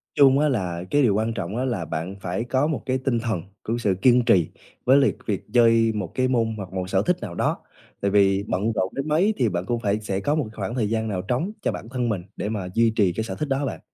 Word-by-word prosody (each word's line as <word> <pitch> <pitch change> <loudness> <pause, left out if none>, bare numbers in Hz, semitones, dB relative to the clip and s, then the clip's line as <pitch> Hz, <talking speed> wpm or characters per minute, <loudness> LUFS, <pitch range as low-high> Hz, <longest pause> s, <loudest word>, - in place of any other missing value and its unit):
Chung 140 -1 +6
á 150 0 +3
là 90 -8 -2
cái 145 - +4
điều 120 -7 +4
quan 110 +2 0
trọng 95 -2 -4
á 130 - 0
là 110 -10 -2
bạn 85 +5 -4
phải 90 +5 -2
có 130 +4 +1
một 155 -3 -2
cái 130 0 0
tinh 130 -2 0
thần 110 -7 -2 0.2
cũng 115 - -2
như - - -3
sự 100 -5 +1
kiên 125 0 +5
trì 85 -7 +4 0.4
với 130 +2 +6
liệt 140 - +3
việc 100 -4 -2
chơi 115 -2 +5
một 95 -6 -3
cái 130 0 +2
môn 115 -3 +1
hoặc 95 -2 -7
một 95 -1 -3
sở 95 0 +2
thích 180 - +2
nào 90 -6 -6
đó, - - 0 0.4
tại 100 0 +1
vì 100 -1 +3
bận 105 +5 0
rộn 95 -1 -1
đến 140 +2 -3
mấy 175 +8 +3
thì 120 -5 +2
bạn 90 0 -3
cũng 120 +3 -1
phải 105 -2 0
sẽ 100 -2 -2
có 145 +9 0
một 155 - +1
cái - - -18
khoảng 105 +3 -4
thời 110 -5 0
gian 110 0 -1
nào 95 -4 -2
trống 125 - -1
cho - - 0
bản 115 - -7
thân 125 -2 -1
mình 100 -5 -1
để 105 - -3
mà 100 -4 -3
duy 115 0 +4
trì 95 -4 +3
cái 110 - -2
sở - - -5
thích 150 - -3
đó 135 - +1
ha 140 - -1
bạn. - - -4
115 Hz, 290 wpm, -24 LUFS, 95-130 Hz, 0.4 s, Chung